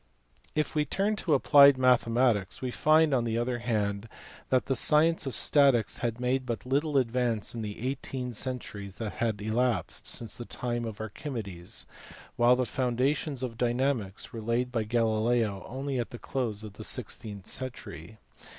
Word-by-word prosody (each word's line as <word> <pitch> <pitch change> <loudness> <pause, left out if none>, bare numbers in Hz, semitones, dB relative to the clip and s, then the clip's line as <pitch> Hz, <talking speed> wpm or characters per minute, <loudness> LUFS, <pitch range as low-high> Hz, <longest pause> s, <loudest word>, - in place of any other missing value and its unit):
If 155 0 0
we 150 -2 +2
turn 200 +7 0
to 160 -8 +1
applied 140 0 +7
mathematics 120 -5 +2
we 130 -1 -3
find 155 +2 +4
on 125 -3 +2
the 115 -1 -1
other 120 +1 -1
hand 105 -2 -2 0.4
that 130 -1 +2
the 135 - 0
science 155 +3 +3
of 135 - -3
statics 135 -8 +4
had 120 -1 -2
made 130 +1 0
but 115 0 -4
little 145 +3 +1
advance 120 -4 0
in 115 - -5
the 110 +3 -4
eighteen 130 -2 -4
centuries 105 -5 -4
that 110 -3 -5
had 110 -3 -1
elapsed 110 -3 -1
since 115 -2 0
the 120 - -6
time 120 -1 -3
of 110 -2 -6
Archimedes, 110 - -5 0.5
while 120 +1 +5
the 125 0 0
foundations 130 +3 -1
of 115 -2 -5
dynamics 120 -3 -1
were 115 - -5
laid 120 +3 -1
by 115 -3 -1
Galileo 110 -2 +1
only 135 +1 -3
at 120 - -3
the 120 - -8
close 115 -5 -3
of 105 -2 -8
the 110 - -9
sixteenth 105 -4 -3
century. 110 -8 -6
120 Hz, 165 wpm, -29 LUFS, 110-130 Hz, 0.5 s, applied